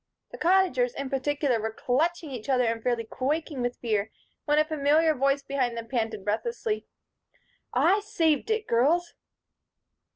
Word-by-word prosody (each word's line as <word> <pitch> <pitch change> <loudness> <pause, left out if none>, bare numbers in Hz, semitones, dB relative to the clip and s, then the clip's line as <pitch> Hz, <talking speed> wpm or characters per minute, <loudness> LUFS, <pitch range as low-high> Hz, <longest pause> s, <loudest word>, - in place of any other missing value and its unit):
The - - -9
Cottagers, 340 -9 +2
in 275 -1 -5
particular, 275 -3 0
were 220 +1 -2
clutching 310 +7 -1
each 245 -1 -7
other 255 -2 +3
and 230 -1 -1
fairly 240 -1 0
quaking 280 +4 -2
with 245 0 -2
fear 220 -3 -1 0.4
when 295 0 +2
a 305 - +4
familiar 310 +1 +3
voice 275 0 +1
behind 260 -4 -1
them 230 0 -6
panted 225 -5 -2
breathlessly: 430 - -2 0.8
"I 400 - +3
saved 345 - 0
it, 440 -1 0
girls." 325 +9 +2
275 Hz, 150 wpm, -27 LUFS, 240-320 Hz, 0.8 s, a